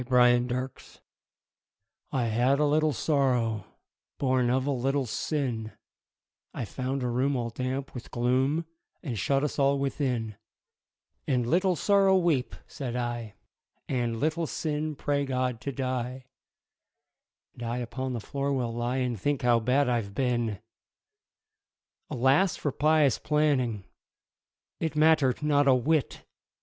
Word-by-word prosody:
The 125 - -19
Penitent 125 +1 +1 1.1
I 130 - 0
had 120 +5 +2
a 150 - +3
little 155 +1 +3
Sorrow, 125 -6 +1 0.5
Born 130 -2 +1
of 130 +1 +1
a 145 - 0
little 135 +1 0
Sin, 115 -2 -2 0.8
I - - -3
found 130 +5 -3
a - - 0
room 130 +4 +1
all 120 -2 -2
damp 130 +3 -3
with 125 - -8
gloom 130 +7 +1 0.4
And 120 -9 -3
shut 135 +6 +1
us 150 - -2
all 140 0 +3
within; 125 -6 -2 0.9
And, 125 -3 +1
"Little 180 +7 +2
Sorrow, 195 +1 +4
weep," 165 -8 +1
said 125 -4 -5
I, 120 -3 -3 0.5
"And, 120 -3 -1
Little 160 +3 0
Sin, 155 0 -2
pray 140 0 0
God 130 -3 -1
to 140 - -3
die, 130 -1 -3 1.3
And - - -14
I 120 +1 -2
upon 125 +2 -4
the 120 - -2
floor 140 +6 -3
will 125 -4 -1
lie 120 +2 -1
And 125 -6 -2
think 145 +1 0
how 120 -1 +4
bad 125 +4 +2
I've 115 -5 -1
been!" 120 -5 0 1.5
Alas 135 +9 +3
for 145 - -2
pious 150 -2 +3
planning 140 -9 +1 1.0
It 160 -2 -2
mattered 155 -4 +3
not 145 -1 +3
a 135 - +6
whit! 145 +3 0
130 Hz, 135 wpm, -28 LUFS, 120-145 Hz, 1.5 s, a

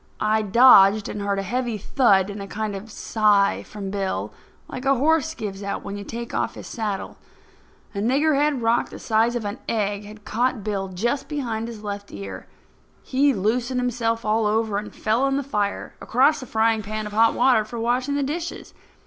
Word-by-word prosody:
I 215 +1 +2
dodged, 210 -2 +6
and 210 - -5
heard 200 0 -1
a 195 - -1
heavy 240 +2 -2
thud 205 -3 +2
and 200 0 -7
a 200 - -6
kind 210 0 -3
of 195 +2 -7
a - - -16
sigh 210 -2 +2
from 200 -2 -7
Bill, 195 -1 -3 0.3
like 255 - -7
a 275 0 +3
horse 320 +4 +2
gives 200 -5 -5
out 200 0 -4
when 200 - -5
you 205 - -6
take 235 +3 -6
his - - -3
saddle 210 -5 -3
off. - - -21 0.8
A 200 - -4
niggerhead 280 +2 +2
rock 230 +1 +2
the - - -9
size 225 +2 +1
of 235 -3 -3
an 205 +5 -4
egg 205 -2 -1
had 210 0 -12
caught 240 -1 0
Bill 195 -2 -2
just 235 +10 -2
behind 235 -7 -3
his 225 -3 -9
left 200 -1 -6
ear. 100 -2 -8 0.6
He 280 +2 +2
loosened 245 +4 0
himself 230 -2 -1
all 215 0 +2
over 215 -1 0
and 210 - -8
fell 230 +5 0
in 275 0 0
the 280 - -1
fire 210 -7 -2
across 265 +6 +3
the 255 - -8
frying 225 0 +2
pan 215 +1 -4
of 210 - -7
hot 225 +1 +4
water 245 -3 +4
for 230 +2 -7
washing 250 +4 0
the 285 - 0
dishes. 325 +5 -5
220 Hz, 200 wpm, -23 LUFS, 205-250 Hz, 0.8 s, dodged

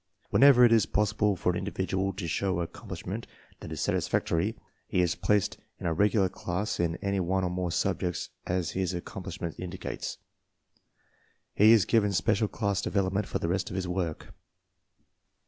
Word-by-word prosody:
Whenever 135 -3 +7
it 120 - +4
is 115 -4 +4
possible 105 0 +1
for 90 - +1
an 90 - -2
individual 95 0 -1
to 95 -2 -5
show 95 +2 0
accomplishment 85 - -6 0.3
that - - -9
is - - -5
satisfactory, 100 +7 0 0.3
he - - 0
is 90 -1 +3
placed 105 -2 +1 0.2
in - - -7
a 85 - +1
regular 100 +2 +3
class 90 +3 -3
in 85 -1 +1
any 100 0 0
one 95 +1 0
or 90 - -1
more 90 -1 -2
subjects 90 0 -1 0.2
as 90 -2 -1
his 95 -1 -1
accomplishment 85 -1 -5
indicates. 90 0 -5 1.4
He 105 +2 +6
is 110 -6 +6
given 105 -3 +2
special 110 +3 +2
class 100 -2 -1
development 100 +1 0
for - - -1
the - - -2
rest 90 +3 -1
of - - -6
his 95 -1 -2
work. 90 -3 -3
95 Hz, 165 wpm, -28 LUFS, 90-105 Hz, 1.4 s, Whenever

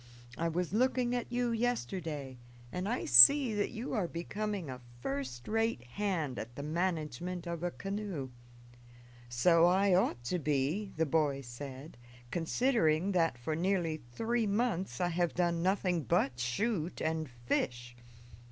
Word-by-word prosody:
I 165 - -1
was 175 +1 -2
looking 250 +1 +2
at 245 -1 -3
you 245 -1 0
yesterday, 160 - -2 0.3
and 185 +3 -3
I 245 - -1
see 215 - +9
that 205 -1 0
you 235 +5 -5
are 205 -7 0
becoming 200 +2 -4
a 130 -1 -7 0.2
first 130 -2 -4
rate 225 - 0
hand 160 - -2
at 120 +2 -7
the 140 - -6
management 170 +1 -2
of 170 -1 -4
a 175 - 0
canoe." 195 -8 -5 1.0
"So 165 +8 +4
I 190 +2 +3
ought 120 -10 +1
to 180 +9 -1
be," 150 +7 -1
the 160 - +2
boy 145 -2 +1
said, 130 +2 -9 0.3
"considering 175 - +1
that 165 -8 +1
for 155 +6 -3
nearly 170 -2 0
three 230 - 0
months 200 -4 -1
I 175 -1 +1
have 175 0 0
done 170 -1 +1
nothing 185 -2 +1
but 140 -6 0
shoot 165 - -1
and 160 -2 -2
fish." 120 0 -3
170 Hz, 145 wpm, -32 LUFS, 140-200 Hz, 1.0 s, see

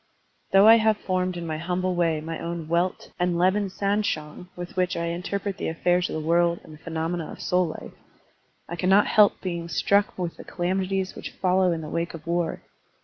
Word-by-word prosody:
Though 195 +2 +7
I 225 +1 +9
have 220 -1 +3
formed 185 -2 -1
in 170 - -5
my 155 -1 -3
humble 180 +2 -1
way 165 -3 +1
my 165 +1 -5
own 170 -1 -5
welt 170 +3 -1
and 180 -1 +1
lebensanschauung 190 -3 0
with 175 0 -7
which 185 -1 0
I 170 - -1
interpret 190 +3 -3
the - - -2
affairs 175 +2 +1
of - - -4
the 155 0 -4
world 170 0 +3
and 155 - -13
the 155 - -14
phenomena 165 0 -3
of - - -10
soul 180 -1 +1
life, 155 - -8 0.7
I 170 - -5
cannot 190 +3 +4
help 210 -1 +4
being 170 -2 -4
struck 200 +4 +2
with 175 -2 -4
the - - -9
calamities 190 +1 -1
which - - -7
follow 185 -1 +2
in 165 -1 -2
the 155 - -7
wake 170 0 -2
of 155 - -11
war. 170 -1 -1
175 Hz, 200 wpm, -25 LUFS, 170-190 Hz, 0.7 s, I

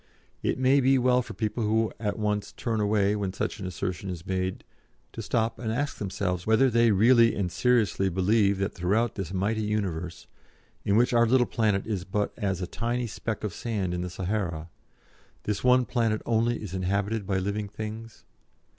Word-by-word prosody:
It - - 0
may 130 +2 +4
be 135 0 +4
well 125 0 +3
for - - -9
people 110 +1 -2
who 110 +1 +1
at 105 -2 -2
once 105 -1 -2
turn 115 -3 -2
away 105 -1 +2
when 100 -3 -2
such 110 - -3
an 95 - -4
assertion 95 +1 -4
is 90 -1 -6
made 95 -1 -2 0.5
to - - -5
stop 115 0 -1
and 110 -2 -2
ask 145 +5 -2
themselves 90 -2 -2
whether 110 +4 +4
they 115 0 +4
really 115 +3 +5
and 95 -3 -2
seriously 110 -6 +2
believe 100 +2 +2
that 100 +1 -2
throughout 105 +6 0
this 95 -4 -5
mighty 100 +4 0
universe, 95 -6 -3 0.6
in 100 - +2
which 120 +1 +3
our 120 0 +4
little 125 +1 +4
planet 105 -5 0
is 105 -5 -2
but 100 +2 -2
as 95 -4 -2
a - - 0
tiny 120 +6 -2
speck 110 0 -4
of 105 -4 -3
sand 100 -7 -2
in 90 - -2
the 90 - -3
Sahara, 90 -3 -3 0.7
this 105 -1 -2
one 125 0 +5
planet 115 -4 0
only 115 0 +1
is 95 -4 -7
inhabited 100 +3 -1
by 95 - +1
living 100 +2 -2
things? 110 +2 -8
105 Hz, 185 wpm, -27 LUFS, 95-115 Hz, 0.7 s, really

